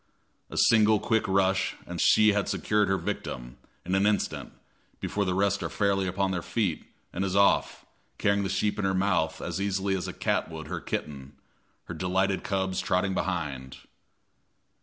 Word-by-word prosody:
A - - -7
single 110 -1 +5
quick 110 0 +1
rush 95 0 +1
and - - -4
she 110 -1 +5
has 105 -1 0
secured 105 -1 +1
her 95 0 +1
victim, - - -5 0.3
in 90 - -2
an 95 +2 +3
instant, 105 - -1 0.5
before 100 -1 -1
the 90 -1 0
rest 100 +1 +1
are - - -3
fairly 100 -2 +1
upon 95 +1 0
their 90 -2 -2
feet, 100 -4 -2 0.3
and 95 - -2
is 95 -1 -1
off, 100 0 +2 0.3
carrying 100 0 +2
the 95 - -2
sheep 100 +2 0
in 100 - 0
her 95 0 +1
mouth 90 -5 0
as 90 +2 -3
easily 100 0 0
as 90 - -3
a - - -3
cat - - -1
would 80 -1 -7
her - - -5
kitten, 70 -1 -5 0.5
her - - -7
delighted 95 +1 0
cubs 95 -2 -1
trotting 95 +1 0
behind. 75 -9 -3
95 Hz, 175 wpm, -27 LUFS, 90-100 Hz, 0.5 s, single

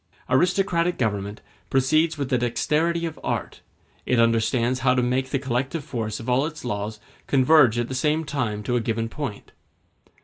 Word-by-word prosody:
Aristocratic 180 +3 +2
government 105 -3 -2 0.3
proceeds 155 +5 +2
with 140 -3 -3
the 125 - +3
dexterity 160 +8 0
of 160 -2 -6
art; - - -3 0.4
it 125 - +1
understands 115 +2 +2
how 130 0 +3
to 125 - +2
make 130 +2 0
the 140 - 0
collective 135 +4 -2
force 115 -6 -4
of 115 - -9
all 130 +4 +2
its 155 -4 -9
laws 105 -1 -3 0.3
converge 130 -3 +5
at 120 0 0
the 130 - -5
same 150 +4 +1
time 120 -8 -2
to 125 - -1
a 120 - +2
given 115 0 -2
point. 135 -6 -6
130 Hz, 170 wpm, -24 LUFS, 115-150 Hz, 0.4 s, converge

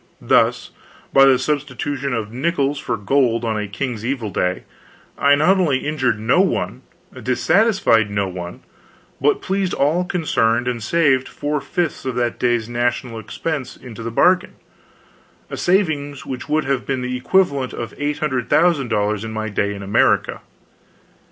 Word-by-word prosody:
Thus, - - +2 0.4
by 135 0 +7
the 135 -1 +5
substitution 145 -1 -2
of 110 -3 -3
nickels 140 +1 -1
for - - -2
gold 120 +2 +1
on 110 -1 -1
a 105 -1 -2
king's 110 +2 -4
evil 120 -4 -2
day, 90 +1 -1 0.5
I 140 0 +4
not 180 +7 +3
only 145 -7 +1
injured 130 -8 0
no 125 +12 +3
one, 195 - -1 0.4
dissatisfied 195 - +2
no 100 -1 -1
one, 90 -1 -7 0.6
but 145 +2 +2
pleased 190 -1 -1
all 155 +6 +2
concerned 120 -10 0
and 120 -2 -2
saved 135 +1 +2
four 145 0 -3
fifths 170 +3 -2
of 130 -2 -3
that 120 -1 -1
day's 120 -3 +1
national 120 0 -2
expense 130 - -4
into 120 -3 -10
the 115 - -4
bargain 180 +10 +2 1.0
a - - -3
saving 155 -6 +1
which 130 -2 -6
would 155 0 +1
have 135 -1 0
been 130 -2 -1
the 125 0 -3
equivalent 140 -2 +1
of 115 - -6
$800,000 135 - 0
in 110 - -5
my 110 0 -3
day 100 0 -1
in 100 - -8
America. 100 +1 +2
130 Hz, 150 wpm, -20 LUFS, 115-150 Hz, 1.0 s, by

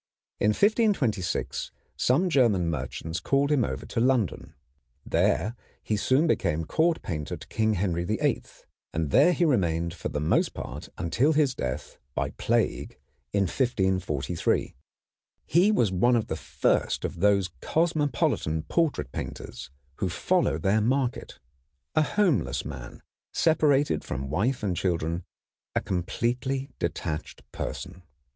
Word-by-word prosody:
In - - +2
1526 140 - +1 0.2
some 150 +10 +2
German 105 - +3
merchants 80 +3 -4
called 140 +1 +1
him 140 -5 +3
over 65 -10 -3
to - - -3
London. 120 -5 +1 0.5
There 110 +4 +1 0.3
he 110 - 0
soon 130 +9 +3
became 80 - +1
court 165 - +1
painter 75 -6 -4
to 110 0 0
Henry 85 -2 0
VIII, 105 +4 0 0.5
and 80 -3 -1
there 175 - +6
he 175 0 +2
remained 85 - +1
for - - -5
the 75 - -3
most 75 - +1
part - - -7
until 125 - +2
his 145 -4 +3
death 65 - -5 0.2
by - - 0
the - - -14
plague - - 0 0.3
in 100 -1 +2
1543. 95 - 0 0.7
He 180 +7 +4
was 120 - +2
one 120 +7 +3
of 115 - 0
the - - -1
first - - 0
of - - -5
those 100 -2 +3
cosmopolitan 145 - +1
portrait 150 - 0
painters - - -6 0.3
who - - -1
follow - - +1
their 95 +7 +2
market, 125 +2 -1 0.6
a 155 - +4
homeless 175 - +1
man, - - -8 0.3
separated 150 -3 +3
from 65 +1 -4
wife 115 - 0
and 95 -4 0
children, 85 -1 -1 0.5
a - - +4
completely 120 +9 -2
detached 75 +1 -3
person. 90 0 -5
105 Hz, 130 wpm, -27 LUFS, 85-140 Hz, 0.7 s, there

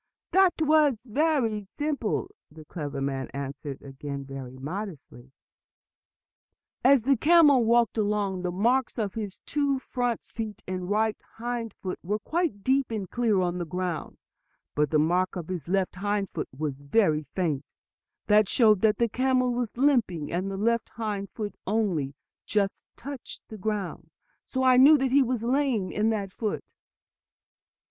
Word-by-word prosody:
"That 380 -2 +5
was 300 -6 +3
just 240 -3 -14 0.4
as 205 -2 -6
simple," 290 - -2 0.2
the 155 0 -13
clever 145 -4 -5
man 135 -1 -2
again 140 - -7
answered 140 0 -6 0.2
very 135 -2 -6
modestly. 145 - -7 1.5
"As 265 -2 +6
the 275 +2 +4
camel 295 -2 +6
walked 235 -1 +3
along, 205 -3 0
the 180 - -1
marks 235 +9 +1
of 210 -4 -1
his 210 -4 -6
two 285 -2 +1
front 245 -3 -2
feet 220 -2 -6
and 185 0 -4
right 215 +1 +1 0.2
hind 235 -2 -4
foot 185 -1 -5
were 205 +5 -1
quite 305 - -2
deep 265 0 +2
and 210 -5 -4
clear 225 -6 +2
on 180 0 -1
the - - -1
ground. 180 0 -4 0.6
But 150 0 +1
the 155 - +2
mark 175 +5 +2
of 175 -2 -6
his 175 -6 -4
left 190 0 0
hind 205 0 -1
foot - - -4
was 140 0 -4
very 155 - +2
faint. 155 -7 0 0.6
That 210 -1 +4
showed 215 -5 +4
that 220 -1 +3
the 235 - +2
camel 255 +1 +1
was 240 -2 -3
limping, 240 - +2
and 185 +3 -1
the 195 - -4
left 230 +3 +1
hind 210 -3 -3
foot 210 -3 -5
only 185 -10 0 0.3
just 200 -2 -1
touched 275 0 -8
the 220 - -8
ground. 205 -2 -3 0.3
So 260 0 -2
I 255 -1 +6
knew 290 +4 +8
that 265 -2 0
he 280 +1 +6
was 245 -3 0
lame 245 -7 +1
in 215 +1 +1
that 200 -4 -2
foot." 215 -3 -3
210 Hz, 160 wpm, -27 LUFS, 180-245 Hz, 1.5 s, knew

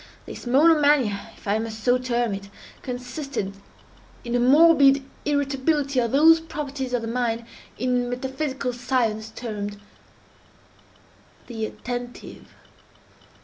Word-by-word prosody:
This - - -9
monomania, 285 -6 +3
if - - -15
I 205 +2 +1
must 220 -1 -6
so 250 +2 +3
term 240 -3 -1
it, 200 0 -7 0.3
consisted 250 -4 -5 0.7
in 235 - -4
a 245 - +2
morbid 275 +1 +6 0.2
irritability 285 -1 0
of 235 -1 +1
those 320 +4 +6
properties 280 -5 -5
of 240 -2 0
the - - -3
mind 235 -1 -1 0.3
in 250 -1 0
metaphysical 265 +1 -3
science 235 -3 -1
termed 205 -3 -6 1.7
the 225 -3 -4
attentive. 245 +1 -7
250 Hz, 110 wpm, -24 LUFS, 230-275 Hz, 1.7 s, morbid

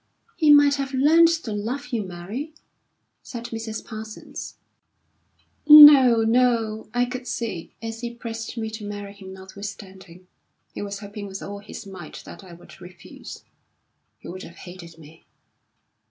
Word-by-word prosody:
"He 310 -3 +4
might 290 -1 +6
have 275 -1 -4
learned 315 +5 +5
to 325 -8 -2
love 240 +7 -4
you, 235 -4 -2
Mary," 200 - -7 0.7
said 235 -2 -8
Mrs. 225 -1 -6
Parsons. 220 -1 -9 1.1
"No, 285 -6 +9
no! 225 -2 +1
I 245 +1 +1
could 250 0 -7
see, 220 -8 -5
as 225 0 -6
he 240 -1 -4
pressed 230 -1 -7
me 220 -1 -4
to 220 -1 -8
marry 205 -1 -7
him 195 -2 -12
notwithstanding, 190 -2 -11 0.5
he - - -6
was 200 0 -6
hoping 205 0 -8
with 195 0 -8
all 200 0 -7
his 205 +1 -10
might 195 -1 -10
that - - -12
I 185 - -14
would 175 +2 -16
refuse. 175 -2 -12 0.7
He - - -14
would 185 +2 -8
have 170 - -11
hated 175 -2 -12
me. 160 0 -16
220 Hz, 150 wpm, -23 LUFS, 195-245 Hz, 1.1 s, No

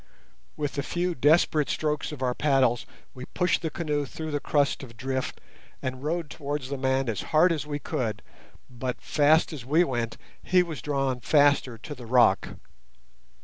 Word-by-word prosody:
With 145 -1 -2
a - - +2
few 175 +4 -1
desperate 150 +1 +3
strokes 150 0 -1
of 140 -3 -6
our 125 -1 +1
paddles 130 -4 +2 0.3
we 130 -1 -8
pushed 180 +3 0
the 165 - -2
canoe 150 -3 -2
through 155 +3 -6
the 145 - -1
crust 145 -1 +1
of 115 -4 -11
drift 130 +1 -3 0.4
and 130 0 -4
rowed 165 +1 -2
towards 145 -3 -4
the 140 - -3
man 130 0 +1
as 110 -3 -2
hard 165 +3 +5
as 155 -2 -2
we 145 -1 -2
could, 110 -7 -3 0.4
but, 125 0 -5
fast 155 +3 +3
as 140 -6 -7
we 155 +7 +3
went, 120 -7 -2 0.2
he 180 -1 +3
was 165 -4 -6
drawn 135 -3 -1
faster 145 -1 +3
to 130 +7 -8
the 125 -4 -10
rock. 125 0 +4
145 Hz, 175 wpm, -27 LUFS, 130-155 Hz, 0.4 s, hard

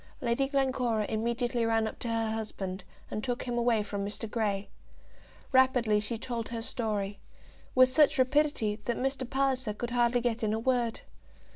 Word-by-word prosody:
Lady 245 +3 +1
Glencora 255 -5 +1
immediately 235 +2 -1
ran 225 -1 +2
up - - -7
to - - -5
her 225 -1 0
husband, 195 -4 -4 0.3
and 215 - -3
took 245 -1 -2
him 245 -1 -3
away 235 -2 +2
from 200 -1 -4
Mr. 205 +3 -4
Grey. 210 -3 -1 0.8
Rapidly 255 -5 +4
she 215 +2 -1
told 230 0 -4
her 230 -1 -4
story, 210 -4 -2 0.6
with 255 0 +8
such 300 +2 +4
rapidity 260 -5 +2
that 240 - -1
Mr. 265 -1 -2
Palliser 265 -5 0
could 240 +2 -4
hardly 240 0 +3
get 235 -1 -1
in 215 -1 +1
a 220 - 0
word. 240 -1 0
235 Hz, 165 wpm, -30 LUFS, 220-255 Hz, 0.8 s, with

